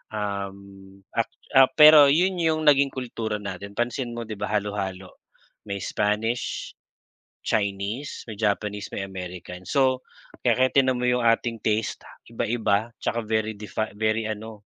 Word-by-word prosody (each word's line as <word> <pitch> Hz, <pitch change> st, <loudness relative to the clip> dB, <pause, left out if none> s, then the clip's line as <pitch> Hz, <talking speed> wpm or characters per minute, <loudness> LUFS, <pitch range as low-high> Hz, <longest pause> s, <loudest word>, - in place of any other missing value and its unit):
Um, 100 Hz, -1 st, -6 dB
a 115 Hz, -, 0 dB, 0.3 s
ah, 130 Hz, -, +8 dB
pero 150 Hz, -2 st, +9 dB
'yon 180 Hz, +5 st, +2 dB
'yong 160 Hz, -1 st, +1 dB
naging 140 Hz, -2 st, +5 dB
kultura 115 Hz, -4 st, -4 dB
natin, 100 Hz, -1 st, -7 dB
pansin 120 Hz, +1 st, -2 dB
mo, 120 Hz, -, -4 dB
'di 110 Hz, -2 st, -7 dB
ba, -, -, -2 dB
halo-halo. 100 Hz, -3 st, -3 dB, 0.6 s
May 100 Hz, -2 st, -4 dB
Spanish, 105 Hz, +6 st, -1 dB, 0.7 s
Chinese, 100 Hz, +6 st, -2 dB
may -, -, -5 dB
Japanese, 105 Hz, -1 st, -1 dB
may 95 Hz, -, -3 dB
American. 90 Hz, -1 st, -8 dB
So, 130 Hz, -2 st, +2 dB, 0.4 s
kaya 130 Hz, 0 st, +3 dB
tingnan 130 Hz, -2 st, +3 dB
mo -, -, -3 dB
'yong 125 Hz, -1 st, +1 dB
ating 115 Hz, 0 st, +2 dB
taste, 110 Hz, 0 st, -1 dB, 0.3 s
iba-iba, 115 Hz, -1 st, 0 dB
'tsaka 120 Hz, -1 st, -1 dB
very 110 Hz, 0 st, 0 dB
defi 105 Hz, +1 st, -3 dB
very 110 Hz, +1 st, +1 dB
ano, 110 Hz, 0 st, -7 dB
110 Hz, 140 wpm, -25 LUFS, 100-125 Hz, 0.7 s, pero